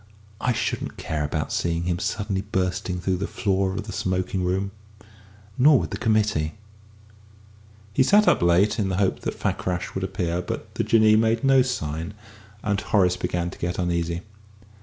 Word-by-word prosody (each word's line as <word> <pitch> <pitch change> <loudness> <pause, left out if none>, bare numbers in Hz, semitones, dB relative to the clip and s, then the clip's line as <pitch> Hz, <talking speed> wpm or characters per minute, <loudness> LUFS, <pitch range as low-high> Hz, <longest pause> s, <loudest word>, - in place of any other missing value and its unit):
I 125 - +1
shouldn't 120 - -2
care 75 -2 -2
about 75 +1 -2
seeing 85 0 0
him 85 0 -1
suddenly 100 -1 -2
bursting 95 -2 -2
through 90 +1 0
the 100 - -3
floor 95 -1 0
of 105 +3 -3
the 105 - -7
smoking 95 0 -1
room. 95 +2 -1 0.9
Nor 145 +2 +7
would - - -2
the 100 - -3
committee." 105 -9 +1 1.4
He - - +3
sat 205 +10 +5
up - - +4
late, 85 +6 +3
in 100 -2 +1
the 95 - -1
hope 95 -1 +1
that - - -4
Fakrash 90 -1 -2
would 95 - -3
appear; 90 -2 -1
but - - -6
the - - -1
Jinnee 110 -1 +5
made 115 +1 +2
no 135 -1 +5
sign, 85 - -3 0.5
and 100 -2 0
Horace 90 -5 +2
began 90 -1 -2
to - - -12
get 90 +1 -2
uneasy. 85 -1 -1
95 Hz, 170 wpm, -24 LUFS, 90-105 Hz, 1.4 s, Nor